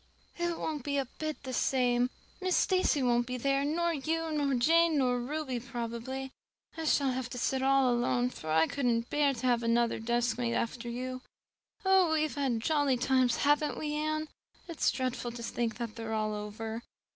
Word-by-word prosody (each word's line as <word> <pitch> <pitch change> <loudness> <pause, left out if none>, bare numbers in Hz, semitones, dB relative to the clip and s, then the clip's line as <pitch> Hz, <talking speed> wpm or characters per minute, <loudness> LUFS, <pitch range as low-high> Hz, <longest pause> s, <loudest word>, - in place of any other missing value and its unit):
"It 345 -1 -1
won't 300 -4 -3
be 285 +1 -1
a 275 - +1
bit 310 -2 -4
the 260 -1 -5
same. 245 -1 +2 0.3
Miss 370 -1 +2
Stacy 370 -7 +2
won't 240 -1 +2
be 250 0 -3
there, 275 +2 +1
nor 335 +4 +1
you 320 +2 -2
nor 285 -3 +1
Jane 325 +5 +4
nor 250 -2 +2
Ruby 265 0 -3
probably. 240 +2 -5 0.4
I 325 -1 -4
shall 280 -3 +3
have 255 0 -3
to 250 - -6
sit 260 +2 0
all 270 -2 +4
alone, 245 +1 +1
for 155 - -8
I 160 +1 +4
couldn't 240 0 -1
bear 290 -2 +2
to 245 +2 -5
have 240 -2 +3
another 235 0 +1
deskmate 240 +1 0
after 235 +1 -2
you. 255 +2 -4 0.6
Oh, 380 -3 +5
we 310 -1 +2
have 310 - -2
had 260 -6 0
jolly 290 -1 +2
times, 255 -1 +2
haven't 295 +1 +2
we, 300 -1 -3
Anne? 310 +1 -1 0.4
It's 335 -3 +1
dreadful 255 -2 -2
to 235 0 -7
think 230 -1 -2
they're 225 -1 -5
all 215 0 0
over." 220 +2 -5
255 Hz, 180 wpm, -31 LUFS, 240-295 Hz, 0.6 s, Oh